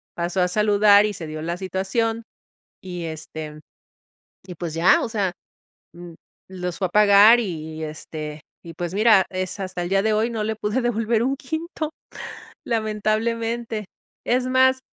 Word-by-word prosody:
pasó 175 +2 -1
a 180 - +3
saludar 205 +1 +5
y 210 - -2
se 170 -4 -7
dio 155 0 -6
la 170 +2 -3
situación 195 +5 -1 0.6
y, 180 -2 -6
este, 155 -1 -7 0.9
y 180 - -9
pues 170 -1 -5
ya. 170 +3 +4
O - - -2
sea, 200 -5 -1 0.6
mm, 175 -1 -11 0.3
los 180 -2 -5
fue 190 - 0
a - - -8
pagar 210 +3 +7
y, 160 -6 -5
este, 155 0 -7 0.2
y 165 -1 -10
pues 175 +1 -4
mira, 210 -2 +5
es 185 +1 -4
hasta 185 -2 -4
el 175 - -3
día 195 +1 +2
de 220 - +1
hoy 220 +3 +1
no 220 -2 -2
le 220 0 -2
pude 215 +4 -1
devolver 230 -1 0
un 270 +3 0
quinto, 315 +2 -4 0.7
lamentablemente. 225 0 -1 0.4
Es 250 +1 +1
más, 260 0 +4
200 Hz, 160 wpm, -23 LUFS, 175-225 Hz, 0.9 s, pagar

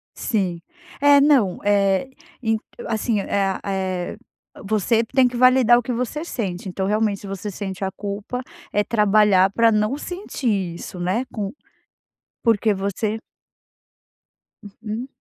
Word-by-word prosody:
Sim, 185 -7 -1 0.4
é, 285 0 +7
não, 275 -10 +4
eh, 200 +3 +2 0.3
en 225 -2 +1 0.3
assim, 220 -1 0
eh 195 -1 0
eh, 190 -2 -2 0.5
você 220 +3 +1
tem 255 +3 +3
que 245 - -5
validar 255 -1 +6
o 245 - +1
que 245 - -4
você 250 +6 -2
sente. 195 - -4
Então, 190 +1 -2
realmente 210 0 0
você 195 +1 -5
sente 195 -1 -5
a 190 - 0
culpa, 205 +5 -5 0.3
é 205 - +2
trabalhar 210 -3 +4
para 230 +1 +4
não 215 +5 +1
sentir 230 - -3
isso, 180 +1 -8
né. 185 +8 0
Com 205 -2 -3 0.9
porque 225 -2 +3
você 200 +3 -2 1.4
Uhum. 215 +3 -6
210 Hz, 130 wpm, -22 LUFS, 195-235 Hz, 1.4 s, é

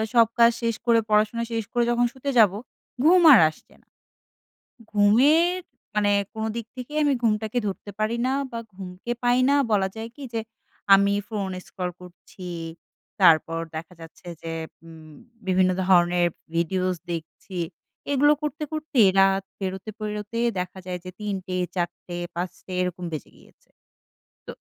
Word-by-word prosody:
সব 230 -2 +7
কাজ 235 0 +7
শেষ 230 -1 0
করে 235 -1 +5
পড়াশোনা 215 +2 +2
শেষ 225 -1 -1
করে 240 -1 +2
যখন 240 0 +2
শুতে 270 +1 -5
যাব 215 -4 +7 0.5
ঘুম 355 +3 +6
আর 230 - +8
আসছে 155 - -17
না। - - -36 1.0
ঘুমের 285 - +4 0.4
মানে 205 -1 +3 0.2
কোনো 220 0 -3
দিক 230 -2 -4
থেকে 250 +4 -7
আমি 285 - +3
ঘুমটাকে 220 +1 0
ধরতে 200 +1 -6
পারি 220 +2 0
না 265 - +1 0.2
বা 230 - -4 0.2
ঘুমকে 185 +4 -7
পাই 245 +1 +3
না 285 - +4 0.2
বলা 195 -2 +3
যায় 225 +1 -6
কি 285 - -10
যে 225 - -1 0.5
আমি 200 +1 +5 0.2
ফোন 200 -4 -3 0.2
scroll 180 -2 -4
করছি, 180 0 -11 0.7
তারপর 165 -1 +5 0.2
দেখা 165 +3 -7
যাচ্ছে 165 +2 -13
যে 165 0 -5 0.3
উম 160 -2 -13 0.3
বিভিন্ন 185 0 +3 0.2
ধরনের 175 -1 +4 0.3
videos 185 +2 0
দেখছি, 170 +3 -7 0.5
এগুলো 290 +2 +5
করতে, 300 0 -3
করতে 310 -4 -2 0.2
রাত 195 0 +4 0.2
পেরোতে, 190 +2 -4
পেরোতে 210 +1 -4 0.2
দেখা 180 +1 -5
যায় 180 -1 -4
যে 185 - -7
৩ঃ০০, 195 -3 -4 0.2
৪ঃ০০, 175 0 -4 0.2
৫ঃ০০ 180 +1 -6
এরকম 180 0 -3
বেজে 155 - -6
গিয়েছে। - - -23 0.8
তো - - -4
205 Hz, 150 wpm, -24 LUFS, 180-235 Hz, 1.0 s, আর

